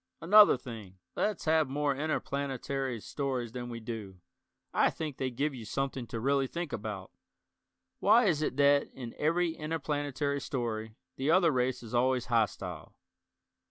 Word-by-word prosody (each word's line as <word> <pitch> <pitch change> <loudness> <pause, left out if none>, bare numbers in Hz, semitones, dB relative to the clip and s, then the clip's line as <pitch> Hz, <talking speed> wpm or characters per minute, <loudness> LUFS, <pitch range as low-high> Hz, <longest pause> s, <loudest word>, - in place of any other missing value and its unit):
Another 205 0 +7
thing, 110 -7 -9 0.2
let's 210 -3 -1
have 160 -3 +3
more 145 0 0
interplanetary 140 -3 -2
stories 130 -4 -3
than 120 0 -6
we 115 -1 -5
do. 110 -5 -7 0.5
I - - +4
think 155 -4 -5
they 130 - -1
give 140 +4 -1
you 120 -3 -8
something 130 +1 -3
to 115 - -4
really 135 +2 +2
think 170 +1 -5
about. 105 -3 -5 0.9
Why 240 +1 +5
is 160 -6 +2
it 155 - -1
that 140 0 +4
in 120 -3 -7
every 170 +2 +2
interplanetary 145 -3 -2
story 110 -5 -3 0.2
the 135 +3 -1
other 170 -1 +5
race 125 -2 0
is 115 - -10
always 125 0 +2
hostile. 115 -5 -1
135 Hz, 150 wpm, -31 LUFS, 120-150 Hz, 0.9 s, Another